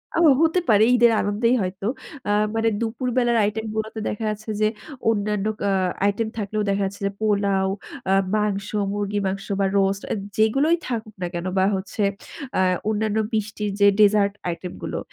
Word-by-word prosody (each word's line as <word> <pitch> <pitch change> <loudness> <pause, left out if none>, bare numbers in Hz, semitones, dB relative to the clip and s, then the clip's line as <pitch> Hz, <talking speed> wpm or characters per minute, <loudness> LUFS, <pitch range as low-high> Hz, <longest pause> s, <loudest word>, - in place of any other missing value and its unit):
ও - - +2 0.2
হতে 330 +2 +3
পারে 215 -1 +6
ঈদের 240 -1 +5
আনন্দেই 220 +4 +1
হয়তো। 190 +1 -4 0.4
আ - - +1 0.2
মানে 225 0 +2
দুপুর 235 +3 -2
বেলার 240 -2 +3
আইটেম 210 +2 -1
গুলোতে 220 0 -3
দেখা 210 - -4
যাচ্ছে 215 +1 -6
যে, 215 - +5 0.4
অন্যান্য 210 -2 0 0.2
আ - - +2 0.3
আইটেম 205 +3 +1
থাকলেও 210 0 -2
দেখা 200 0 +1
যাচ্ছে 195 +1 -6
যে - - -2
পোলাও, 200 -2 +1 0.4
আ - - +5 0.2
মাংস, 205 -2 0 0.2
মুরগির 205 0 -2
মাংস 195 +1 -3
বা 195 - +3
রোস্ট 195 0 +1
আ - - +2 0.2
যেগুলোই 270 +10 +3
থাকুক 220 -3 -4
না 180 - -1
কেন 175 0 -4
বা 190 - +4
হচ্ছে 195 +2 -3 0.5
আ - - +3 0.3
অন্যান্য 215 0 0 0.2
মিষ্টির 210 -1 -2
যে 200 - +6
ডেজার্ট 205 -1 +5 0.2
আইটেম 175 +1 -5
গুলো। - - -3
210 Hz, 170 wpm, -23 LUFS, 200-220 Hz, 0.5 s, পারে